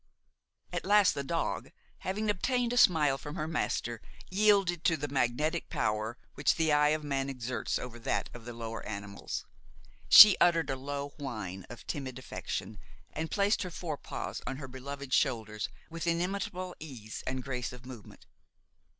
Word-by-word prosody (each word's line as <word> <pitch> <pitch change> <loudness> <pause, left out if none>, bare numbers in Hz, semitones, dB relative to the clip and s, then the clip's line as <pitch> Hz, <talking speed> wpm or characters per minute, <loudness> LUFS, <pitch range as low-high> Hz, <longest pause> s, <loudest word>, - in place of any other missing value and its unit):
At - - -2
last 205 -1 +5
the 140 - -3
dog, 165 +4 -2 0.3
having 210 +3 -1
obtained 245 +5 0
a - - -1
smile 150 - +5
from 150 - -7
her 155 - -2
master, 120 -7 -2 0.3
yielded 195 -4 +3
to 165 - +4
the 145 0 -3
magnetic 145 +5 0
power 110 +2 -1 0.2
which 140 - +2
the 160 -1 +2
eye 150 0 +5
of 155 +1 +1
man 140 -2 -1
exerts 125 -2 -2
over 120 -1 -7
that 115 - -1
of 120 -1 -10
the 120 - -6
lower 115 -1 -6
animals. 100 -1 -5 0.6
She 210 -2 +12
uttered 165 -3 +4
a - - -1
low 140 +1 -4
whine 105 -9 -5
of 120 - -10
timid 130 -3 -4
affection 130 - -5 0.3
and 160 +1 -3
placed 205 +1 +2
her 185 - -3
fore 170 -3 -4
paws - - -5
on 135 - -3
her 135 -2 -7
beloved's 135 +1 -7
shoulders 110 -6 +1 0.2
with 165 0 -4
inimitable 180 +1 -1
ease 125 -8 -8
and 130 0 -2
grace 125 -2 -3
of 125 0 -12
movement. 125 -5 -11
140 Hz, 165 wpm, -31 LUFS, 125-170 Hz, 0.6 s, She